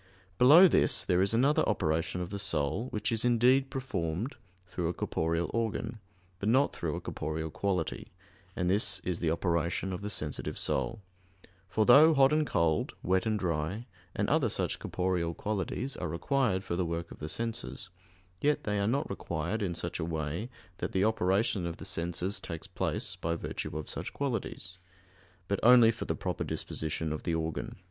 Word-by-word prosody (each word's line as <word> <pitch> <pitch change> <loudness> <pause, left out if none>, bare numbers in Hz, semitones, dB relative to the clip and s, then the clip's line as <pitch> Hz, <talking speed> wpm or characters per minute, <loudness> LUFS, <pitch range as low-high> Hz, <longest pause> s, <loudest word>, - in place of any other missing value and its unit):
_ - - -37
Below 155 +9 +9
this, 120 -8 +3
there 90 -1 +3
is 100 +3 +2
another 135 +6 +4
operation 80 -2 0
of 90 - -5
the 100 - -3
soul, 95 - 0
which 110 +2 -2
is 115 -1 0
indeed 125 +3 +4
performed 115 - -3 0.3
through 90 -1 -3
a 85 - -2
corporeal 85 +1 -1
organ, 115 0 -2 0.4
but 100 - 0
not 135 +5 +3
through - - -2
a - - -3
corporeal 80 +1 -4
quality, 95 -3 -2 0.4
and 90 - -1
this 100 +1 +3
is 90 -2 -2
the 85 - 0
operation 85 +2 0
of 90 - -5
the 105 - -4
sensitive 75 -7 -3
soul; 115 -3 -1 0.7
for 110 +2 +2
though 150 +7 +8
hot 135 +1 +5
and 155 -1 +2
cold, 80 -2 +1
wet 95 +4 +1
and 110 -1 +1
dry, 90 +4 -2 0.3
and - - 0
other - - +2
such - - -1
corporeal 90 -2 -1
qualities 110 +6 -3
are - - -3
required 100 - 0
for 85 - -3
the 90 - 0
work 85 0 -4
of - - -11
the 75 - -5
senses, 115 -1 -5 0.5
yet 150 +1 +2
they 105 -1 -1
are 100 - +1
not 140 +7 0
required 85 +7 -3
in 90 -4 -1
such 85 - -3
a - - -1
way 80 +6 -3 0.3
that - - -3
the 95 +2 +3
operation 100 -2 +1
of 85 - -5
the - - -9
senses 90 +1 -1
takes 85 -1 -7
place - - -2
by 85 +1 -1
virtue 75 - -4
of 80 - -5
such - - -5
qualities; 115 -8 -3 0.7
but 100 +1 0
only 120 -1 +7
for - - -6
the - - -1
proper - - -3
disposition 80 0 -3
of 80 - -5
the 85 - -1
organ. 80 -1 -3
95 Hz, 185 wpm, -30 LUFS, 85-115 Hz, 0.7 s, Below